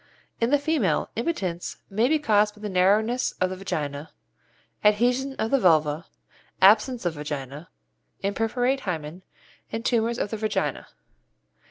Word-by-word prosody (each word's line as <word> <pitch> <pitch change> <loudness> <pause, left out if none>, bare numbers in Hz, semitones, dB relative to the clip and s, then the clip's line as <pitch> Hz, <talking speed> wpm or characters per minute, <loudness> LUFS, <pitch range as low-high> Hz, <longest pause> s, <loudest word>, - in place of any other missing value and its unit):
In 230 - +1
the 290 - +4
female, 285 - 0
impotence 195 - -3
may 220 +5 +1
be 310 +3 +3
caused 210 -7 +2
by 210 - -16
the 210 - -4
narrowness 210 +7 +2
of 185 0 -1
the - - -3
vagina, 155 -6 -4 0.7
adhesion 245 +6 +2
of 220 - -2
the 275 - +4
vulva, 160 -4 +2 0.5
absence 215 +3 +4
of 175 - 0
vagina, 145 0 -6 0.5
imperforate 235 +6 0
hymen, 170 - -5 0.5
and 225 +1 -4
tumours 235 0 +1
of 205 - -2
the 220 - -2
vagina. 215 0 -2
210 Hz, 140 wpm, -25 LUFS, 175-240 Hz, 0.7 s, the